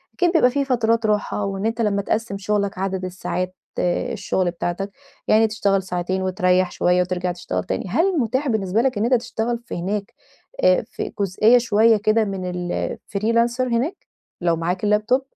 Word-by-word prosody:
أكيد 355 -2 +2
بيبقى 310 -7 +5
في 280 +1 0
فترات 230 -3 +1
راحة 210 -1 0
وإن 195 +1 -3
أنت 225 +1 -1
لمّا 205 -2 +1
تقسِّم 215 0 -2
شغلك 200 -1 -1
عدد 190 -1 -2
الساعات 185 0 -4 0.2
آآ 175 -1 0
الشغل 185 -2 -1
بتاعتك، 180 +3 -3 0.4
يعني 220 +1 +5
تشتغل 200 -3 +1
ساعتين 185 +1 -2
وتريح 185 -1 +2
شويّة 180 0 +2
وترجع 180 0 -1
تشتغل 90 - -3
تاني. 95 - -3
هل 340 - +2
متاح 260 +4 0
بالنسبة 215 -3 +1
لك 255 -3 0
إن 205 - 0
أنت 250 - +2
تشتغل 235 -1 -1
في - - -6
هناك 195 +3 -3 0.5
آآ - - +5
في - - -5
جزئية 205 +5 +4
شويّة 225 -1 +4
كده 215 +2 +2
من 190 -2 -4
الFreelancer 225 +6 -1
هناك 255 +6 0 0.4
لو 170 -1 +2
معاك 175 +4 -2
الLaptop؟ 210 +5 +2
205 Hz, 170 wpm, -22 LUFS, 185-230 Hz, 0.5 s, بيبقى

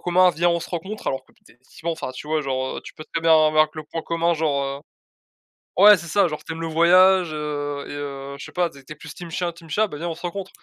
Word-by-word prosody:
communs, 180 +1 +4
viens 175 +1 +1
on 170 - +2
se 170 - -8
rencontre!» 190 +5 -6
alors 135 0 -2
que - - -26
put - - -34
effectivement 130 +7 -7
enfin 145 -5 -5
tu 130 +3 -9
vois, 155 0 0
genre, 130 -1 -2
heu, - - -7
tu - - -10
peux 155 - -10
très 165 - -1
bien 165 - +3 0.2
avoir 155 0 +3
que 155 - -11
le 155 - -6
point 165 +1 -5
commun, 170 0 0
genre, 145 -3 0
heu 140 0 -4 1.0
ouais 210 0 +10
c'est 170 -1 -8
ça 200 +1 +3
genre 150 -1 -6
«Tu 165 - -5
aimes 165 - -7
le 165 - -2
voyage, 180 +2 +5
heu 145 -1 -4
et - - -7
heu, 140 -1 -6
je - - -7
sais - - -11
pas 175 -2 0
tu 140 - -15
es 145 +3 -11
plus 155 +1 -10
team 175 -1 -9
chien, 175 +1 -2
team 165 -1 -16
chat, 215 +7 +2
bah 150 - -8
viens 170 +3 -4
on 165 - -4
se - - -14
rencontre». 190 +2 -4
160 Hz, 290 wpm, -23 LUFS, 145-175 Hz, 1.0 s, ouais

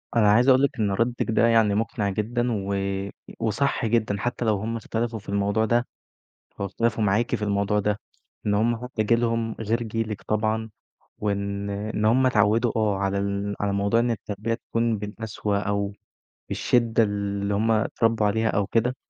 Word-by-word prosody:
أنا 105 -3 +5
عايز 120 +4 +4
اقول 130 +1 +6
لِك 140 -1 +1
إن 105 -2 +1
ردِّك 115 +3 0
ده 115 - +4
يعني 115 -3 +4
مُقنع 105 -1 -1
جدًا، 115 +5 -1
و 100 -2 -2 0.6
وصح 115 +4 0
جدًا، 110 -2 +1
حتى 120 +2 -2
لو 105 -3 +2
هٌم 115 +3 -3
اختلفوا 115 +1 -3
في 100 - -13
الموضوع 100 +2 +1
ده، 120 +2 +1 0.7
لو 100 - 0
اختلفوا 110 +2 0
معاكِ 105 +4 +1
في - - -2
الموضوع 100 0 +1
ده، 105 +1 0 0.5
إن 105 - +2
هُم 115 +3 +2
حتى 125 -3 -2
جيلُهم 115 0 +1
غير 115 +2 0
جيلِك 110 -3 -3
طبعًا، 110 +2 -1 0.5
وإن 100 -1 -2
إن 105 +1 -2
هُم 125 +4 +4
اتعودوا 115 -1 +3
أو 110 -2 +2
على 100 0 -1
ال 100 +1 -2
على 100 -1 0
موضوع 100 +3 +2
إن 120 0 +1
التربيّة 110 0 -3
تكون 115 -1 -1
بالقسوة 105 0 -3
أو 100 -1 -1 0.6
بالشدة 115 -2 +2
اللي 100 -1 -1
هُم 110 +3 +1
اتربوا 110 0 +2
عليها 110 +2 +1
أو 100 -2 0
كده، 120 +4 0
110 Hz, 170 wpm, -25 LUFS, 100-115 Hz, 0.7 s, اقول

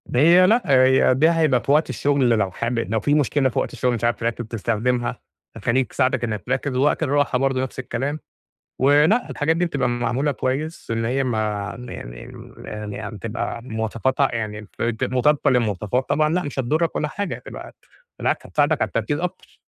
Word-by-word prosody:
هي 170 +7 +6
لأ 235 +3 +4
هي 130 -1 +5
دي 155 +5 +4
هيبقى 155 -7 +2
في 140 - 0
وقت 150 +1 +3
الشغل 135 0 +1
لو 105 -5 +2
حابب 115 -1 -2
لو 110 - +1
في 145 - +1
مشكلة 145 -2 +2
في - - -2
وقت - - -3
الشغل 125 -1 0
مش 115 - -6
عارف 120 0 +2
تركّز 115 0 -2
تستخدمها، 115 +2 -1 0.4
هتخلّيك 125 +5 0
تساعدك 130 -2 +1
إنك 105 -4 -3
تركّز 135 +1 -1
ووقت 145 +5 +2
الراحة 145 -3 +1
برضه 135 0 +1
نفس 130 0 -5
الكلام، 135 +4 -3 0.6
ولأ 150 - +4
الحاجات 160 +2 0
دي 175 - +2
بتبقى 140 -7 -1
معمولة 120 +4 0
كويس 140 +5 -3
إن 115 0 -1
هي 135 +3 0
ما 120 -4 -1 0.5
يعني - - -6 0.2
يعني - - -10
م 105 -1 -8
يعني 105 +1 -6
تبقى 115 +2 -4
مواصفاتها 120 +3 0
يعني 105 -2 -3
الفر 115 +2 -4
مطابقة 140 +3 +2
للمواصفات، 115 +1 0
طبعًا 155 0 +2
لأ 180 0 +1
مش 140 -1 -5
هتضُرّك 155 +6 0
ولا 150 - 0
حاجة 200 +6 -4
هتبقى - - -10 0.4
بالعكس - - 0
حتساعدك - - +1
على - - +2
التركيز - - -2
أكتر. - - -6
130 Hz, 180 wpm, -22 LUFS, 115-145 Hz, 0.6 s, هي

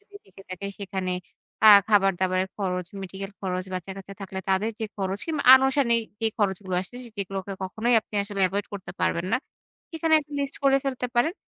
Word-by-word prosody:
যদি 410 0 -27
থেকে 195 0 -16
থাকে, 185 +2 -5
সেখানে 190 -2 -3 0.5
আ - - +10 0.2
খাবার-দাবারের 190 -2 +2
খরচ, 180 -3 -2 0.2
মেডিকেল 195 +1 -6
খরচ, 185 -1 -2
বাচ্চা-কাচ্চা 195 +2 -7
থাকলে 190 -1 -6
তাদের 195 +4 +2
যে - - 0
খরচ 195 0 -2
কিংবা 310 -3 -1
আনুষঙ্গিক 265 -3 +3 0.2
যে 225 - +2
খরচগুলো 190 -2 -1
আসে, 190 +6 -13 0.2
যেগুলোকে 195 0 -4
কখনোই 220 +6 0
আপনি 215 - -17
আসলে 200 -1 -5
এভয়েড 200 +2 -2
করতে 190 -3 -7
পারবেন 170 +2 0
না। - - +5 0.6
এখানে 320 0 +2
একটা 295 0 -14
লিস্ট 280 -1 -3
করে 275 0 +5
ফেলতে 255 -2 -2
পারেন। 275 +8 +3
195 Hz, 175 wpm, -25 LUFS, 190-235 Hz, 0.6 s, আ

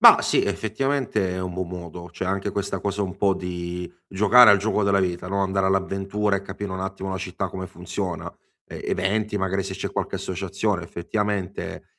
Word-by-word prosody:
Bah - - +10
sì, - - +3
effettivamente 110 -2 0
è 90 0 -3
un 90 -1 -3
buon 95 -1 -2
modo. 85 -1 -7
Cioè, 90 +2 -4
anche 95 +1 0
questa 100 -1 -2
cosa 100 0 -1
un 95 -1 -4
po' 100 -1 +3
di 90 -1 -4 0.2
giocare 105 +4 +8
al 100 - +7
gioco 105 +1 +1
della 100 0 +4
vita, 90 -1 -1
no, 100 0 0
andare 95 0 +1
all'avventura 95 +2 +1
e 100 - -1
capire 100 0 -5
un 95 - -3
attimo 95 0 -4
la 95 - -2
città 95 0 -3
come 95 0 -6
funziona. - - -4 0.3
E - - -8
eventi, 105 +2 0
magari 95 0 0
se 95 0 -5
c'è - - -4
qualche - - -2
associazione, 95 +1 -1
effettivamente, 100 +3 -3
95 Hz, 190 wpm, -25 LUFS, 90-100 Hz, 0.3 s, Bah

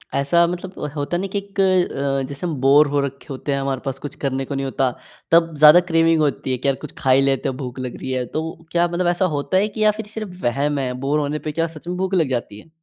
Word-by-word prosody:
ऐसा 155 +5 +3
मतलब 180 -3 -5
होता 145 +4 -1
न 195 +3 -2
कि 200 +1 -4
इक 200 0 -6
अ, 140 -8 +1
जैसे 140 +4 -6
हम 170 - -1
बोरे 145 +2 +5
हो 145 0 +1
रखे 135 0 -8
होते 135 +2 -4
हैं, 140 - 0
हमारे 135 -1 -2
पास 135 -1 -3
कुछ 145 - -7
करने 135 -1 -1
को 140 - -5
नहीं 135 0 -2
होता, 135 -1 0 0.4
तब 165 0 +4
ज़्यादा 150 +3 +9
क्रेविंग 165 0 +3
होती 140 -3 0
है 130 - 0
कि 130 - -3
यार 135 - +3
कुछ 150 - -7
खा 130 - +1
ही 130 +1 +5
लेते 135 -1 +1
हैं 130 - -5
भूख 130 -2 -6
लग 125 -1 -5
री 130 - -3
है, 130 -1 -1
तो 160 +4 -5
क्या 175 0 +3
मतलब 175 +1 -1
ऐसा 175 +2 +2
होता 145 +6 0
है 200 +2 +3
कि 215 - -3
या 215 - +6
फिर 220 - -5
सिर्फ़ 215 -3 -5
वहम 140 +4 0
है, 130 -2 -1
बोरे 150 +2 +1
होने 150 +1 -2
पे - - -1
क्या 165 +2 0
सच 160 - -14
में 180 - -3
भूख 190 +1 -2
लग 165 -7 +2
जाती 120 -5 -3
है? 165 - -17
145 Hz, 275 wpm, -21 LUFS, 135-175 Hz, 0.4 s, ज़्यादा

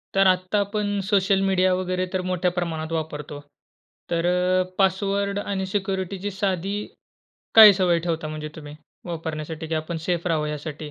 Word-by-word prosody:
तर 195 0 +5
आत्ता 185 +2 +2
आपण 205 0 -1
सोशल 195 -1 +3
मीडिया 185 -1 +2
वगैरे 185 0 -1
तर 185 - 0
मोठ्या 180 0 +1
प्रमाणात 160 -2 -3
वापरतो. 150 -2 -4 0.7
तर 170 0 0
अ, 180 +1 +2
पासवर्ड 200 +1 +1
आणि 195 -2 -3
सिक्युरिटीची 195 0 -3
साधी 195 0 -1 0.8
काय 215 -2 +11
सवय 180 -3 +2
ठेवता 160 -2 -2
म्हणजे 155 0 -5
तुम्ही 150 -2 -9 0.3
वापरण्यासाठी 160 -1 -5
की 160 - -3
आपण 155 +2 -3
सेफ 175 -1 0
राहावं 155 -3 0
यासाठी? 150 0 -6
185 Hz, 150 wpm, -24 LUFS, 160-195 Hz, 0.8 s, काय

